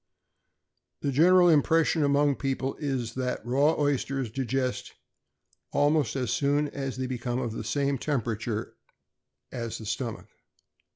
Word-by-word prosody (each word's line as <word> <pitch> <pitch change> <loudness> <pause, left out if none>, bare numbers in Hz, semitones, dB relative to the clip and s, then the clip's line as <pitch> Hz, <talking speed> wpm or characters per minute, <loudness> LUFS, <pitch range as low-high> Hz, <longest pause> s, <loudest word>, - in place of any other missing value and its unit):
The 140 - +1
general 175 +6 +6
impression 160 0 +3
among 145 +1 +3
the 140 - 0
people 135 -1 -2
is, 130 -6 -2
that 125 -2 -3
raw 140 +6 +3
oysters 140 -4 0
digest 130 +1 -2 0.8
almost 145 0 +2
as 125 -4 -1
soon 145 +1 +1
as 135 -2 -5
they 130 - -2
become 125 -1 -3
of 120 -3 -2
the 110 - -5
same 140 +4 0
temperature 115 -5 -2 0.8
of 115 -3 -4
the 110 - -9
stomach. 115 +2 -4
135 Hz, 130 wpm, -27 LUFS, 120-145 Hz, 0.8 s, general